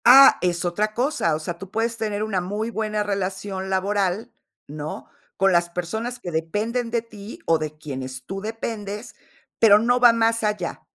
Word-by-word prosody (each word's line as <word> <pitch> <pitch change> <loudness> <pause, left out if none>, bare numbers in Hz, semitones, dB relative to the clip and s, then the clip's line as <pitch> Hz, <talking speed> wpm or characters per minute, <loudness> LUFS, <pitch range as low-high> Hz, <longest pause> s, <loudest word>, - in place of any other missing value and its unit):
Ah, 270 +3 +9
es 175 -1 0
otra 210 +5 0
cosa, 245 - +1
o - - -3
sea, 170 +2 -5
tú 195 - -8
puedes 230 +2 -1
tener 210 -2 -2
una 200 -4 -1
muy 210 +5 -3
buena 215 -2 -1
relación 190 -1 -3
laboral, 200 +3 0 0.4
¿no?, 150 +1 -6 0.3
con 195 0 +4
las 175 -1 +3
personas 220 +8 -4
que 180 -7 -6
dependen 210 +10 -1
de 235 0 +1
ti 215 -2 -10
o 165 - +4
de 155 0 -5
quienes 130 -3 -6
tú 195 +5 -5
dependes, 215 0 -5 0.4
pero 210 -2 +8
no 245 +3 +2
va 245 -1 +8
más 230 0 +2
allá, 210 -5 -2
205 Hz, 175 wpm, -23 LUFS, 175-225 Hz, 0.4 s, Ah